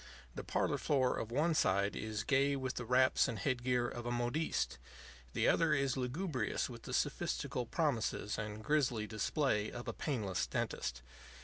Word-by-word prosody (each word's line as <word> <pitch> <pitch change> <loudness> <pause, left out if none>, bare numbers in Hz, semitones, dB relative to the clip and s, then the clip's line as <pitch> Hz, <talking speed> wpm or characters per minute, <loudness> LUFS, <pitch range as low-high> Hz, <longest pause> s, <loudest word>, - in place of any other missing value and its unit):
The - - -6
parlor - - 0
floor 130 -3 +2
of 110 - -4
one 155 +7 +2
side 100 -7 +2
is 110 -1 -3
gay 140 +1 +3
with 130 -1 -2
the 125 - -4
wraps 130 +2 +4
and 115 - -3
head 120 +6 -1
gear 125 -1 +2
of 120 0 -5
a - - -1
modiste; 120 - -1 0.5
the - - +2
other 165 -2 +4
is 135 -2 +1
lugubrious 130 - -1
with - - -9
the - - -8
sophistical 125 -2 -1
promises 125 -9 0
and 105 0 -5
grisly 130 -5 +1
display 110 0 0
of 120 - -7
a - - -2
painless 110 - -1
dentist. 60 0 -3
125 Hz, 170 wpm, -35 LUFS, 110-140 Hz, 0.5 s, wraps